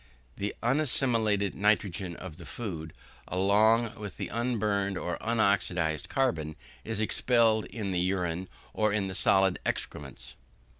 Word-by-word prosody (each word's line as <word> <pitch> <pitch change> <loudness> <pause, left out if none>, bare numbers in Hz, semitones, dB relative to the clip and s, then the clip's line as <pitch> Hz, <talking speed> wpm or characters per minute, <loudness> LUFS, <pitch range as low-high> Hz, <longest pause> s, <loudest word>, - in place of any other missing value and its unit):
The 100 +1 -3
unassimilated 115 -7 +2
nitrogen 100 -4 0
of 80 - -9
the 85 - -11
food, 85 -9 -5 0.4
along 110 +5 +3
with 105 -3 -7
the - - -4
unburned 105 -4 0
or 90 - -3
unoxidised 95 -8 +1
carbon, 80 - 0 0.3
is 110 -1 -1
expelled 110 0 +3
in 105 -4 -4
the 90 - 0
urine 90 -1 -1 0.3
or 110 -1 +1
in 100 -1 0
the 95 - -4
solid 95 -1 +3
excrements. 65 -3 -4
100 Hz, 130 wpm, -29 LUFS, 90-110 Hz, 0.4 s, along